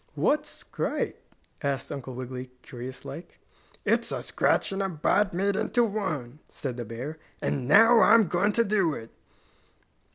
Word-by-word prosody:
"What's 300 0 +1
scrite?" - - -3 0.4
asked 140 -2 -2
Uncle 130 -2 -6
Wiggily, 130 0 -6
curious 125 +1 -8
like. 170 +1 -9 0.5
"It's - - +2
a - - -3
scratch - - +1
and 195 0 -2
a 195 - 0
bite 180 +4 +2
made 195 +3 0
into 240 +4 +2
one," 155 - -3
said 130 -4 -5
the 120 - -4
bear, 125 +8 -6 0.2
"and 130 -3 -2
now 225 - +7
I'm 225 +1 +7
going 195 +3 +1
to 230 - +3
do 195 -7 +2
it." 115 - -9
160 Hz, 155 wpm, -27 LUFS, 130-205 Hz, 0.5 s, now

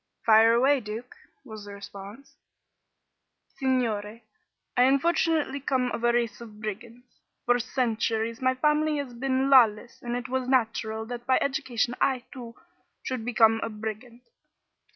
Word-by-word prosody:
"Fire 225 0 +6
away, 270 +4 +3
Duke," 225 +2 -7 0.3
was 215 -4 -9
the 205 - -9
response. 200 +5 -11 1.1
"Signore, 230 -4 -2 0.5
I - - +3
unfortunately 300 +1 +1
come 255 -2 -1
of 235 - -5
a 240 - +4
race 235 -2 -1
of 215 -3 -11
brigands. 230 +4 -8 0.3
For 245 0 +3
centuries 230 -1 -1
my 260 0 +2
family 300 +2 +1
has 280 -4 -5
been 265 +2 -1
lawless 235 -3 +4
and 240 0 -4
it 245 0 -4
was 260 0 -2
natural 220 -3 0
that 240 +1 -8
by 260 - +4
education 260 -4 -1
I, 260 -3 +1
too, 240 -3 -9 0.5
should 255 -3 -4
become 225 -1 +3
a - - -3
brigand. 220 +3 -7
240 Hz, 140 wpm, -26 LUFS, 220-260 Hz, 1.1 s, Fire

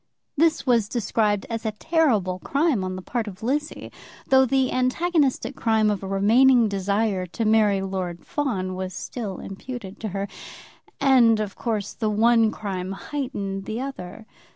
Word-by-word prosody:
This 320 +2 +2
was 235 -5 +2
described 210 -3 0
as 230 -1 -4
a 220 -2 -2
terrible 215 - +1
crime 280 - +1
on 185 0 -3
the 185 - -7
part 235 0 -3
of 200 +1 -9
Lizzie, 295 +5 -2 0.4
though 265 0 +5
the 265 0 +1
antagonistic 280 +3 +1
crime 220 -2 +2
of 205 - -3
a 195 - -6
remaining 230 +5 +4
desire 200 -1 -1
to 225 +6 -3
marry 210 -3 +3
Lord 185 -3 -4
Fawn 200 -11 -2
was 185 0 -5
still 210 -7 -5
imputed 200 0 -8
to 220 - -4
her. 200 0 -3 0.7
And, 240 -5 +5
of 210 -2 -3
course, 220 -4 -3
the 220 -2 -2
one 225 +1 +4
crime 190 -3 -4
heightened 200 -7 -4
the 220 +2 -4
other. 225 -6 -7
220 Hz, 155 wpm, -24 LUFS, 195-255 Hz, 0.7 s, though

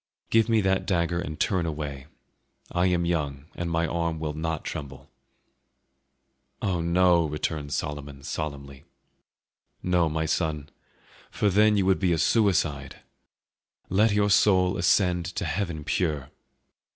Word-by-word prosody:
Give 115 0 +4
me 110 -1 +3
that 95 -1 0
dagger 85 -2 0
and 80 -4 -6
turn 90 -3 +1
away; 75 -3 -5 0.6
I 90 +1 +2
am 90 -1 +1
young 75 -5 -2
and 85 0 -4
my 85 0 +1
arm 85 -1 -2
will 75 -1 -3
not 80 0 -3
tremble." 70 -3 -7 1.5
"Oh 90 -4 -1
no!" 85 0 +3
returned 75 -1 -3
Solomon 75 -2 -4
solemnly, 70 -3 -6 1.0
"no, 90 -2 +2
my 80 +1 -1
son, 75 -2 -1 0.6
for 105 - 0
then 105 +2 +4
you 95 - +2
would 95 0 +3
be 90 -3 +2
a - - +1
suicide! 80 - +1 0.9
Let 105 +4 +3
your 105 0 +2
soul 95 -2 +4
ascend 90 -3 +2
to 100 - -2
heaven 80 -1 -3
pure! 75 -5 -1
85 Hz, 135 wpm, -26 LUFS, 75-95 Hz, 1.5 s, Give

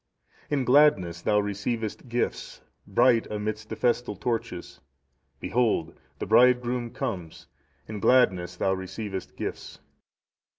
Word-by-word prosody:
"In 145 -3 +1
gladness 120 - +4
thou 105 +2 +2
receivest 105 +4 -3
gifts, 120 +1 -3 0.3
bright 120 +3 +3
amidst 105 0 -4
the - - -4
festal 120 -3 0
torches; 110 -4 -4 0.6
behold! 110 -9 0 0.2
the - - -4
Bridegroom 125 -1 +3
comes, 90 -9 -5 0.4
in 105 -1 -6
gladness 90 -7 +3
thou 95 +2 +1
receivest 95 +1 -6
gifts. - - -6
110 Hz, 110 wpm, -26 LUFS, 95-120 Hz, 0.6 s, gladness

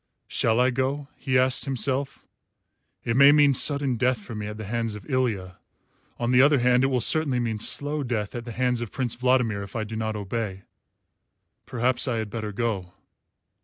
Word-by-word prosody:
"Shall 115 +1 +1
I 125 +1 +3
go?" 135 +3 -2
he 130 -2 0
asked 130 +2 +2
himself. 135 +1 -2 0.8
"It 115 - -1
may 140 +2 +8
mean 145 -1 +5
sudden 140 -2 +1
death 125 +2 +1
for 105 +3 -10
me 105 -1 -5
at 105 0 -7
the 110 - -7
hands 115 0 -3
of 105 - -11
Ilya. 110 -10 -2 0.6
On 120 0 -1
the 125 0 +6
other 145 +1 +5
hand, 125 0 +3
it - - +4
will 130 -2 0
certainly 140 0 +3
mean 115 -3 -2
slow 145 +6 0
death 115 -6 -3
at 120 -1 -6
the 120 - -6
hands 125 0 -1
of 120 - -5
Prince 125 -4 -1
Vladimir 125 -4 +1
if 100 +2 -9
I 110 - -1
do 110 +1 -7
not 110 0 -3
obey. 100 -1 -4 1.0
Perhaps 125 +1 +1
I 125 - 0
had 110 -2 -4
better 110 -2 -4
go." 100 -5 -3
120 Hz, 195 wpm, -25 LUFS, 110-130 Hz, 1.0 s, may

